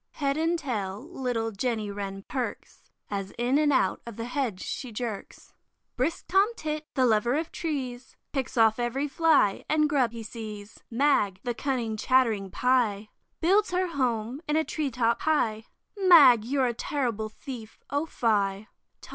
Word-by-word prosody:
Head 280 -2 -1
and 325 +2 +1
tail 215 - -4
little 245 -7 -2
Jenny 220 -1 -2
Wren 195 -1 -5
perks, 255 -2 -5 0.2
As 195 -1 -4
in 245 +4 +2
and 300 -1 +3
out 195 -9 +2
of 235 - -7
the 230 - -5
hedge 245 -7 -2
she 255 - -5
jerks. 220 -2 -6 0.4
Brisk 275 +7 -1
Tom 390 +2 +4
Tit, 305 -3 -4
the 260 - +3
lover 235 +2 +2
of 320 +2 -2
trees, 260 -6 -4 0.2
Picks 265 -3 -3
off 225 0 +4
every 250 +4 -1
fly 295 -9 +3
and 305 0 +3
grub 270 -6 +2
he 230 -1 -7
sees. 215 -2 -8
Mag, 230 -7 +2
the 245 - -1
cunning 235 -4 -2
chattering 220 -4 +2
Pie, 220 -4 +1 0.3
Builds 395 +5 +3
her 365 0 0
home 250 -3 -1
in 300 - +1
a 315 - +3
tree 305 -2 -2
top 235 -2 0
high, 225 -9 +1 0.3
Mag, 315 - +7
you're 265 +1 +1
a 240 - 0
terrible 230 -4 -2
thief, 225 -1 -9
O 285 +3 0
fie! 205 -5 0
245 Hz, 160 wpm, -27 LUFS, 220-290 Hz, 0.4 s, Mag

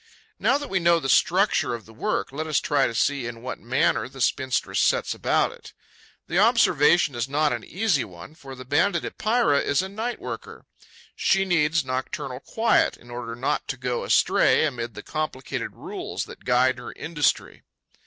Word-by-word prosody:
Now 275 - +3
that 290 0 -6
we 190 - +2
know 170 -1 +4
the 135 - -4
structure 185 - +3
of 115 - -10
the 110 - -15
work, 110 - -2
let 155 +3 -4
us 155 -2 +2
try 135 - +1
to 115 - -5
see 135 0 0
in 115 0 -8
what 130 - -5
manner 125 +2 0
the 135 - -13
spinstress 130 +2 0
sets - - +2
about - - +1
it. - - -14 0.5
The 175 - 0
observation 175 - +4
is 120 +2 -3
not 150 0 +1
an 120 -2 -4
easy 185 - 0
one, 90 - -11
for 135 -4 -11
the 130 0 -10
Banded 165 +6 +1
Epeira 215 -10 +1
is 145 +5 +1
a 190 - -5
night 225 +5 -4
worker. - - -8 0.5
She 195 0 +2
needs 160 -4 +2
nocturnal 130 +1 -4
quiet 225 +10 +1
in 120 - -16
order 120 -1 -6
not 125 +3 -2
to 135 - -4
go 125 -1 -2
astray - - +3
amid 120 -5 -4
the - - -8
complicated 155 -4 -4
rules - - -5
that - - -13
guide 125 +1 +3
her 120 - -8
industry. 160 -3 -1
140 Hz, 185 wpm, -24 LUFS, 125-170 Hz, 0.5 s, know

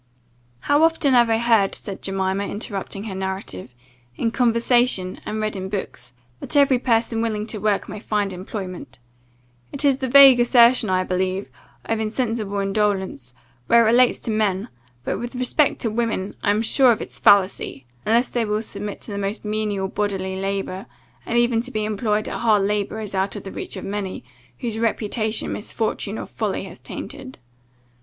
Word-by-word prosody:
"How 290 +1 +2
often 325 -4 +3
have 240 -2 +5
I 225 - +3
heard," 225 -4 +3
said 195 -2 -7
Jemima, 195 +1 -1
interrupting 200 -1 -5
her 215 -3 -5
narrative, 190 - -5 0.5
"in 230 - -1
conversation, 235 -5 +2
and 215 +1 -3
read 215 -1 -2
in 190 0 -5
books, 185 -11 -5 0.3
that - - -3
every 275 -3 +5
person 230 -2 +1
willing 215 -2 -1
to 220 -1 -4
work 205 0 0
may - - -7
find 205 -2 -1
employment? 185 0 -7 0.7
It 280 +1 -1
is 275 -2 +4
the 260 - -2
vague 270 -1 +8
assertion, 240 -2 +5
I 185 0 +2
believe, 185 +1 -2 0.3
of 225 -1 -1
insensible 220 -2 -2
indolence, 195 - -1 0.3
when 235 - +5
it - - +7
relates 240 +2 +4
to 225 - -3
men; 205 -3 0 0.3
but, - - -2
with 240 +2 -6
respect 255 +4 +1
to 225 - -1
women, 220 -4 -2
I - - 0
am 210 +2 +2
sure 255 +2 +4
of 220 - -1
its - - -8
fallacy, 190 -9 +3 0.2
unless 235 +3 +2
they 240 - 0
will 210 0 -1
submit 205 -1 -6
to - - -9
the 200 - -3
most 200 +2 -4
menial 210 -2 -1
bodily 190 -2 -2
labour; 195 0 -3 0.4
and 235 - 0
even 240 -1 +3
to 250 - -8
be 215 -4 -2
employed 210 0 -1
at - - -4
hard 215 -4 +3
labour 205 +2 -1
is 210 -2 -6
out 190 +2 -1
of 205 - -7
the 195 - -7
reach - - -5
of - - -6
many, 200 -1 -4 0.4
whose 225 -3 -3
reputation 220 -1 0
misfortune 215 -1 -3
or - - -5
folly - - -3
has - - -10
tainted. 265 -2 -8
215 Hz, 180 wpm, -22 LUFS, 195-235 Hz, 0.7 s, vague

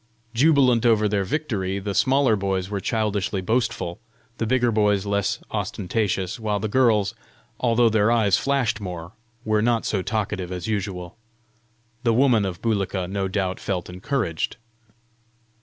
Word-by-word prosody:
Jubilant 130 -3 +4
over 110 -3 +4
their 100 -1 0
victory, 100 -6 -2
the 100 +1 -3
smaller 130 0 +3
boys 95 -1 -2
were 100 - -1
childishly 105 -2 -1
boastful, 110 -4 -1 0.4
the 115 - 0
bigger 120 0 +2
boys 105 -2 +2
less 100 -1 0
ostentatious, 95 -1 -2
while 105 -2 -1
the 110 - -2
girls, 110 -3 +3 0.5
although 120 -1 +3
their 110 -1 +3
eyes 110 -5 +3
flashed 135 -6 0
more, 90 -3 -6 0.3
were 110 -1 +2
not 115 0 +1
so 100 - 0
talkative 100 -3 -2
as 90 -2 -4
usual. 100 -4 -3 0.8
The 115 -2 +2
woman 120 -5 +4
of 90 -2 -5
Bulika 100 -5 -1
no 95 +1 -2
doubt 95 -1 -2
felt 90 -3 -3
encouraged. 90 - -2
105 Hz, 140 wpm, -23 LUFS, 95-115 Hz, 0.8 s, Jubilant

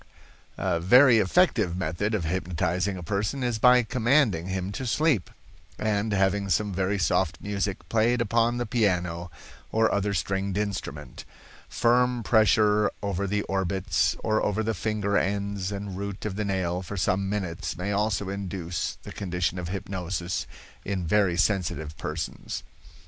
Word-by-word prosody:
"A 85 - 0
very 120 +7 +6
effective 105 - +2
method 95 +5 -1
of 95 - -1
hypnotizing 90 +2 -1
a 90 - -7
person 105 +9 -2
is 120 -3 -1
by 125 +1 +6
commanding 115 - +2
him 95 0 -3
to 130 +5 -4
sleep, 145 - +1 0.5
and 110 0 0
having 100 0 +1
some 100 +4 +1
very 95 +2 0
soft 85 -2 +1
music 100 -1 -3
played 115 +2 +2
upon 115 +1 +2
the 120 - -1
piano, 90 -6 0 0.4
or 110 0 +3
other 100 0 0
stringed 95 +2 -1
instrument. 85 -10 -4 0.5
Firm 125 0 +2
pressure 105 0 +4
over 100 0 -1
the 105 +1 0
orbits, 95 0 0
or 110 0 +1
over 105 +2 0
the 110 +1 0
finger 100 -1 0
ends 100 -1 -2
and 100 -1 -5
root 100 +1 -5
of 105 -3 -3
the 105 +1 -2
nail 90 -2 -1
for 100 +2 -6
some 95 +1 0
minutes 95 -3 -3
may 95 +3 -2
also 105 0 0
induce 95 -3 -4
the - - -9
condition 90 -1 -2
of 85 -1 -5
hypnosis 90 -1 -3 0.4
in 95 -3 -2
very 95 0 +2
sensitive 85 -6 0
persons. 75 +1 -4
100 Hz, 150 wpm, -26 LUFS, 90-105 Hz, 0.5 s, very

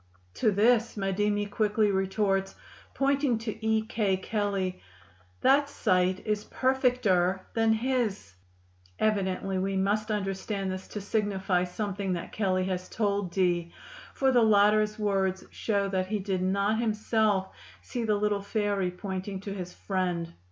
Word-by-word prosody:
To 220 - +2
this 225 +3 +3
Madimi 205 +1 0
quickly 210 0 +1
retorts, 195 0 0 0.4
"pointing 275 -3 +2
to 220 0 -6
E. 220 0 +2
K." 210 -3 0
(Kelley), 195 -2 -2 0.6
"That 280 +1 +4
sight 185 -6 +1
is 210 -1 -1
perfecter 245 -9 +2
than 225 -1 +3
his." 225 - -1 0.6
Evidently 195 -2 0
we 195 +1 -1
must 210 +3 0
understand 195 -1 -2
this 185 0 -6
to 210 - -6
signify 195 -3 0
something 195 0 -3
that 170 - -5
Kelley 185 -3 0
has 185 -1 -3
told 200 -3 0
Dee, 175 -2 +1 0.4
for 270 -1 +3
the 245 -2 +4
latter's 215 0 +4
words 195 -3 0
show 200 -3 0
that 185 -1 -1
he 210 +2 -1
did 190 -2 -2
not 200 +3 +1
himself 215 -3 +1 0.3
see 245 -2 -4
the 215 -2 +2
little 205 0 0
fairy 200 -2 0
pointing 190 +1 -5
to 200 0 -5
his 180 -2 -6
friend. 180 -4 -2
200 Hz, 135 wpm, -28 LUFS, 190-215 Hz, 0.6 s, That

